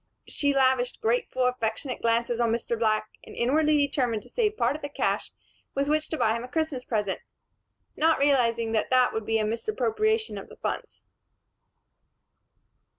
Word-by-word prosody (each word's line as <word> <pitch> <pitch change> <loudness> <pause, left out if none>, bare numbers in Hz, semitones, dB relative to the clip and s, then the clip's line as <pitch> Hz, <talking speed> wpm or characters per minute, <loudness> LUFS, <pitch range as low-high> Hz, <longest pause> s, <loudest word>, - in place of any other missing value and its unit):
She 285 -1 0
lavished 260 -2 +2
grateful, 245 +2 0
affectionate 250 +1 -2
glances 235 +1 +1
on 235 -1 +2
Mr. 235 0 -1
Black 215 -1 +1 0.2
and - - -12
inwardly 300 +5 +3
determined 255 -7 0
to - - -16
save 430 -3 0
part - - +1
of 305 - -7
the 285 - -5
cash - - -1 0.4
with 275 +1 0
which 305 +1 0
to 315 - -2
buy 220 -5 +2
him 230 - -4
a - - -6
Christmas 305 -2 -2
present, 210 -5 -1 0.8
not 320 +1 +3
realizing 235 -5 +2
that 220 -1 0
that 255 -1 +4
would 220 -1 -4
be 225 - +2
a 215 - 0
misappropriation 435 - 0
of - - -12
funds. - - -5
250 Hz, 160 wpm, -27 LUFS, 230-300 Hz, 0.8 s, that